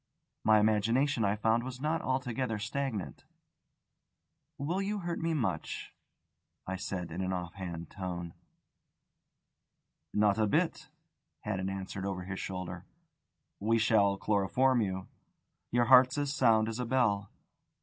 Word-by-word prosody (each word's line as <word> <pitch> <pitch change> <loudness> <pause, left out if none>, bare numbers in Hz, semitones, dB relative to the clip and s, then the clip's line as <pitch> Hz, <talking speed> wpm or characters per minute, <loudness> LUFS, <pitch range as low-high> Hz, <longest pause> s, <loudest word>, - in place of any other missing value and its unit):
My 110 0 +6
imagination, 115 +5 +2
I 100 0 +2
found, 110 +2 +2
was 130 0 -6
not 155 +3 0
altogether 130 -3 -1
stagnant. 115 0 -3 1.3
"Will 170 +8 -1
you 205 +1 -2
hurt 170 -1 -3
me 165 0 0
much?" 125 -7 -3 0.7
I 95 - -3
said 90 -2 -4
in 90 +3 -3
an 95 0 -1
off 90 -2 -4
hand 85 -4 -6
tone. 90 -3 -5 1.8
"Not 105 0 +3
a 110 - +3
bit," 160 - 0 0.5
Haddon 95 -2 -2
answered 95 0 -4
over 95 -2 -3
his 95 +1 -5
shoulder. 95 -2 -5 0.7
"We 115 +3 +2
shall 105 -3 +3
chloroform 115 +6 +2
you. 95 -2 -2 0.6
Your 120 0 +2
heart's 130 +1 +7
as 145 -1 0
sound 115 -6 +4
as 115 +1 -4
a 125 - -1
bell." 105 -6 +1
110 Hz, 130 wpm, -31 LUFS, 95-130 Hz, 1.8 s, heart's